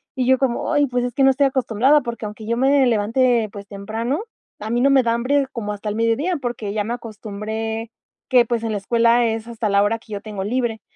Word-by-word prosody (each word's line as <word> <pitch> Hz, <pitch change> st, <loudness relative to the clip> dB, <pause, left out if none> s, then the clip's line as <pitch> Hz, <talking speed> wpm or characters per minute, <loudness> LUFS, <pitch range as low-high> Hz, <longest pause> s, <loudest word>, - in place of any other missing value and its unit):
Y 255 Hz, -1 st, -1 dB
yo 260 Hz, 0 st, +5 dB
como: 260 Hz, +2 st, -1 dB
"Ay, 290 Hz, -1 st, +3 dB
pues, 245 Hz, -1 st, -1 dB
es 245 Hz, -1 st, -4 dB
que 275 Hz, -, +2 dB
no 270 Hz, -, +6 dB
estoy 275 Hz, +1 st, +3 dB
acostumbrada, 265 Hz, +2 st, +2 dB
porque 235 Hz, -2 st, -5 dB
aunque 210 Hz, +1 st, -9 dB
yo 235 Hz, +1 st, -1 dB
me 270 Hz, +1 st, +4 dB
levante, 230 Hz, 0 st, +2 dB
pues, 200 Hz, -1 st, -9 dB
temprano, 225 Hz, -, -3 dB, 0.4 s
a 215 Hz, -, -6 dB
mí 240 Hz, +1 st, +1 dB
no 275 Hz, -, +4 dB
me 265 Hz, -2 st, +5 dB
da 230 Hz, 0 st, +1 dB
hambre 270 Hz, +4 st, +1 dB
como 210 Hz, -4 st, -4 dB
hasta 210 Hz, +1 st, -5 dB
el 210 Hz, -, -3 dB
mediodía, 240 Hz, +10 st, +1 dB
porque 235 Hz, -4 st, -4 dB
ya 210 Hz, -1 st, 0 dB
me 235 Hz, -, -2 dB
acostumbré 220 Hz, 0 st, -5 dB, 0.4 s
que 250 Hz, -2 st, +5 dB
pues, 230 Hz, 0 st, -2 dB
en 225 Hz, -, -2 dB
la 210 Hz, -, -1 dB
escuela 235 Hz, +3 st, +3 dB
es 225 Hz, 0 st, -3 dB
hasta 230 Hz, -2 st, -3 dB
la 200 Hz, 0 st, +4 dB
hora 225 Hz, +2 st, 0 dB
que 215 Hz, -2 st, -12 dB
yo 200 Hz, -, -4 dB
tengo 205 Hz, -3 st, -5 dB
libre". 230 Hz, -1 st, -2 dB
230 Hz, 240 wpm, -21 LUFS, 215-255 Hz, 0.4 s, no